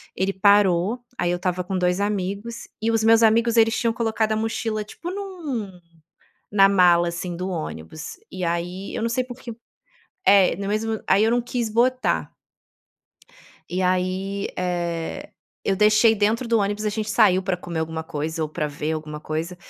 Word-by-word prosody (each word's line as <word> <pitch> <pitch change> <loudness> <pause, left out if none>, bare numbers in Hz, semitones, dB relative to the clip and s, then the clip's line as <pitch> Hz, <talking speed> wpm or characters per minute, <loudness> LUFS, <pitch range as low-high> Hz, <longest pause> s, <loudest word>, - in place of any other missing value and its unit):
ele 190 +2 0
parou, 200 +2 +3 0.2
aí 175 - 0
eu - - +1
estava 180 0 -2
com 190 -1 -2
2, 180 +1 +1
amigos 205 +3 -3 0.2
e 225 - +1
os 225 -1 +1
meus 225 0 +5
amigos, 230 +1 +3
eles 225 0 +4
tinham 230 - +1
colocado 225 -1 0
a - - +2
mochila, 220 -1 -2
tipo, 340 +11 -8
num 310 - -5 0.7
na 195 -1 +6
mala, 175 -3 +5
assim, 170 +1 -4
do 185 +1 -3
ônibus. 155 - -6
E 185 -1 -5
aí, 175 +3 -3
eu - - -3
não 230 - 0
sei 255 +2 0
por 250 0 -10
quê 235 -3 -8 0.7
é, 195 -3 +5
no 200 - -5
mesmo 220 +1 -1
aí 195 +2 +4
eu 225 - +3
não 240 +1 +2
quis 240 -1 -2
botar 250 +3 +1 1.4
e 185 +2 -2
aí, 185 +2 -1
eh, 175 -2 -3 0.3
eu 195 - +1
deixei 215 +2 +5
dentro 220 +4 0
do 230 -1 +3
ônibus. 205 +1 -1
A - - +2
gente 215 0 -3
saiu 195 -4 +4
pra 185 -1 -1
comer 170 -2 -5
alguma 160 0 -3
coisa 160 +1 -4
ou 155 - -2
pra 155 0 -2
ver 150 +2 -3
alguma 155 -1 -5
coisa. 160 +4 -4
200 Hz, 180 wpm, -23 LUFS, 175-225 Hz, 1.4 s, na